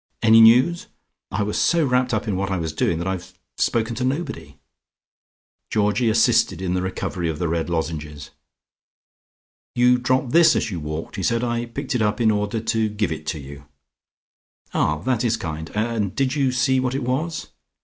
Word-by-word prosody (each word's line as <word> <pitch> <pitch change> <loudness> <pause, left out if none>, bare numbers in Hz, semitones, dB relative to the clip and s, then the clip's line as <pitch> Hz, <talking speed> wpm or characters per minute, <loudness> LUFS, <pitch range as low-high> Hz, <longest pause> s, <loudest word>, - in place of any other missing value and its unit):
Any 115 0 +7
news? 125 +10 +5 0.4
I 105 - -1
was 105 +1 -1
so 170 -3 +3
wrapped 125 -1 +1
up 110 0 -1
in 105 - 0
what 95 +1 -2
I 95 - -1
was 80 -2 -3
doing 80 +1 0
that 85 - -4
I've 95 -2 -5 0.2
spoken 115 0 0
to 125 - -2
nobody." 140 +3 -3 1.1
Georgie 105 +3 +1
assisted 110 -4 +3
in 90 -1 -2
the 90 - 0
recovery 90 -2 -3
of 80 - -3
the 85 - -1
red 85 +1 -2
lozenges. 80 -3 -4 1.4
"You 125 0 +4
dropped 130 +1 0
this 165 0 +6
as - - -1
you 90 - -4
walked," 75 +6 -6
he - - -3
said. 115 +5 0
"I 120 0 -2
picked 135 +4 -5
it 125 - 0
up 105 +2 0
in 110 -2 +4
order 105 +1 -1
to 110 0 0
give 105 -3 -2
it 75 -1 -3
you." 70 0 -10 1.1
"Ah, 75 0 +1
that 125 -1 0
is 115 -1 +1
kind, 80 -2 -5
and 110 -2 -1
did 135 0 0
you 135 -3 +1
see 130 +1 +2
what 130 0 -1
it 135 - -2
was?" 150 +7 -2
110 Hz, 185 wpm, -22 LUFS, 90-125 Hz, 1.4 s, Any